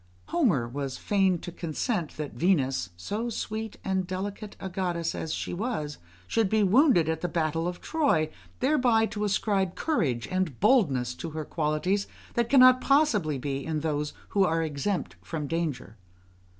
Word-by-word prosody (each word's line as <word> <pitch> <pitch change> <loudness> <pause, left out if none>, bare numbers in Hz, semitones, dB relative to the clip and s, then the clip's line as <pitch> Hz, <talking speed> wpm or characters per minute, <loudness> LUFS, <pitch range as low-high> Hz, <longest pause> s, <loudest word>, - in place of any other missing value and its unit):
Homer 195 - +2
was 135 +1 -4
fain 195 -3 +2
to 175 - -6
consent 170 - -3
that 150 -2 -4
Venus, 135 - +1
so 210 - -3
sweet 220 -1 -4
and 190 -1 -1
delicate 200 +2 -5
a 190 - -5
goddess 175 -3 -2
as 160 - -4
she - - -3
was, 175 -7 -3 0.3
should 220 - +1
be 215 0 +3
wounded 200 - +5
at 160 0 -1
the 175 - 0
battle 165 -1 -1
of 175 0 -5
Troy, 220 - +1 0.3
thereby 250 -5 +3
to 210 -1 -4
ascribe 195 -2 0
courage 135 - 0
and 185 -8 -1
boldness 145 - +3
to 165 - -6
her 155 - -3
qualities 165 +7 0 0.3
that 235 -1 0
cannot 255 -2 +7
possibly 220 - +3
be 135 +1 -3
in 155 -2 -2
those 150 -1 -1 0.2
who 200 - +3
are 165 -2 +1
exempt 145 - -2
from 150 - -4
danger. 145 -8 -3
175 Hz, 160 wpm, -27 LUFS, 150-210 Hz, 0.3 s, cannot